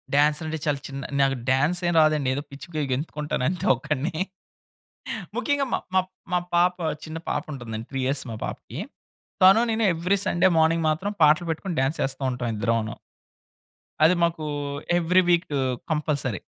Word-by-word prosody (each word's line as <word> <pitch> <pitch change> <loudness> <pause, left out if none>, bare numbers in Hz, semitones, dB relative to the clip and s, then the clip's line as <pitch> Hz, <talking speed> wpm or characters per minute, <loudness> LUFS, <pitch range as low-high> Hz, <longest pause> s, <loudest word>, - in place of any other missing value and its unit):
Dance 150 +1 +4
అంటే 160 0 -3
చాలా 145 -2 +1
చిన్న 135 0 -6 0.2
నాకు 135 0 +3 0.2
డాన్స్ 145 +7 +3
ఏం - - 0
రాదండి. 155 -3 +3
ఏదో 145 - -2
పిచ్చిగా 155 +3 -5
గెంతుకుంటానంతే 150 +3 -2
ఒక్కడిని. 155 +5 -2 1.1
ముఖ్యంగా 285 -1 +1
మా - - +3 0.2
మా 190 - +5 0.3
మా 180 - +3 0.2
పాప, 180 +1 +3 0.3
చిన్న 160 0 -6
పాప - - -1
ఉంటుందండి. 115 -4 -6
3 135 - -3
ఇయర్స్ 135 +1 -1
మా - - -4
పాపకి. - - -7 0.7
తను 195 +4 +8
నేను 225 0 +1
ఎవ్రి 180 +4 +1
సండే 175 +2 +3
మార్నింగ్ 160 +1 +3
మాత్రం 180 +7 -1
పాటలు 155 +3 +5
పెట్టుకొని, 170 +2 -3
డాన్స్ 135 +4 0
ఎస్తా 135 0 -4
ఉంటాం 125 -1 -3
ఇద్దరమును. 115 0 0 1.1
అది 160 +3 +7
మాకు 165 -2 0 0.5
ఎవ్రి 175 +2 +4
వీక్ 175 0 +3 0.4
కంపల్సరీ. 145 - -1
155 Hz, 150 wpm, -25 LUFS, 135-175 Hz, 1.1 s, తను